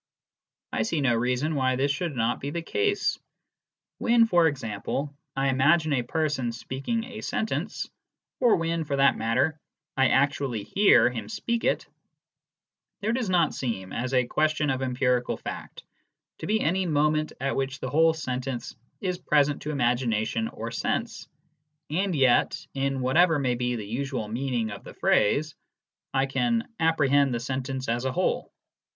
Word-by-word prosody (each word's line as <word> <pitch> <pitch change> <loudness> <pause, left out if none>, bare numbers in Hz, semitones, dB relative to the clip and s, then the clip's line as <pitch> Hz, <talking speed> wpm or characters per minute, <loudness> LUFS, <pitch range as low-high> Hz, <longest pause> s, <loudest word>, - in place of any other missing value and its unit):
I - - 0
see 170 -8 0
no 130 -4 +3
reason 125 +6 0
why 130 -3 +1
this 135 +2 +1
should 150 +1 -3
not 120 0 0
be 140 - -4
the 170 +3 -4
case. 415 - 0 0.8
When, 235 -1 +4
for 175 -6 +4
example, 135 +1 -3 0.2
I 135 0 +1
imagine 150 +4 +3
a 130 - +2
person 140 -2 -1
speaking 135 - -3
a 235 -3 -8
sentence, 220 - -2 0.5
or 245 -3 +5
when, 165 0 -1
for 145 -2 -2
that 140 -1 +4
matter, 130 +7 0 0.4
I 135 -1 +4
actually 135 -4 +1
hear 195 - +5
him 120 - -6
speak 235 +2 -2
it, - - +1 1.2
there 215 +2 0
does 240 -5 -1
not 175 -4 +3
seem, 105 -7 -4
as 130 +3 -2
a 125 -1 +3
question 155 +2 +1
of 130 0 -2
empirical 125 -1 0
fact, - - -8 0.6
to - - -5
be 215 +2 +2
any 185 +3 +1
moment 155 0 +1
at 135 +1 -1
which 135 0 -2
the 130 - -4
whole 160 +2 +4
sentence 130 -4 -4 0.3
is 180 -2 -2
present 145 -4 +2
to 150 - -5
imagination 120 -4 0
or 115 +1 -6
sense, 115 - -2 0.6
and 185 +2 0
yet, 130 -4 +3
in 135 -1 -1
whatever 160 +6 +4
may 130 -3 +1
be 125 0 -1
the 110 -3 -5
usual 125 +1 -3
meaning 120 -1 -2
of 100 - -8
the - - -11
phrase, 150 +8 +2 0.6
I 135 0 +2
can 230 - 0
" - - -52
apprehend 145 -5 +3
the - - -1
sentence 130 +1 -3
as 120 +2 -1
,a 130 - +1
whole." - - -1
135 Hz, 160 wpm, -26 LUFS, 125-160 Hz, 1.2 s, or